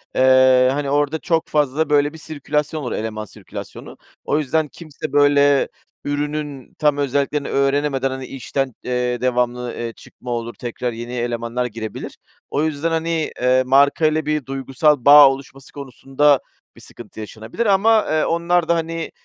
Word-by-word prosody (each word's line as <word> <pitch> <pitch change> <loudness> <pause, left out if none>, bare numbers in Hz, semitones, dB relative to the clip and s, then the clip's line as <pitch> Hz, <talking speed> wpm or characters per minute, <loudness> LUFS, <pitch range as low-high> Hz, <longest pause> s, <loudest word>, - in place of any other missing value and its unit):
Eee, 130 0 +5
hani, 140 0 -2
orada 145 +2 0
çok 165 0 0
fazla 150 +1 0
böyle 145 0 +2
bir 160 - -10
sirkülasyon 150 0 -3
olur, 125 - -4
eleman 110 -1 -4
sirkülasyonu. - - -10 0.3
O 150 - +1
yüzden, 155 +1 0
kimse 155 -2 -9
böyle 145 -1 +4 0.4
ürünün 145 -2 -4
tam 150 -1 +2
özelliklerini 140 +1 -1
öğrenemeden, 140 -1 0
hani, 130 0 -6
işten, 135 0 -3
eee, 125 -1 -2
devamlı, 125 -1 -1
eee, 115 -1 -5
çıkma 125 - -11
olur, 120 0 -3
tekrar 120 0 -4
yeni 120 +2 -7
elemanlar 120 0 -2
girebilir. 110 -2 -7 0.3
O 145 - 0
yüzden, 155 +1 -1
hani, 165 -1 -1
eee, 130 +1 +3
markayla 145 +4 +3
bir 150 -2 -1
duygusal 135 +1 0
bağ 145 -1 +9
oluşması 135 0 -8
konusunda 140 +1 +1 0.4
bir - - -16
sıkıntı 115 -2 -13
yaşanabilir 110 - -5
ama, 215 +2 +4
eee, 155 0 +1
onlar 170 0 +1
da, 170 - +3
hani, 165 0 -3
140 Hz, 150 wpm, -20 LUFS, 125-150 Hz, 0.4 s, bağ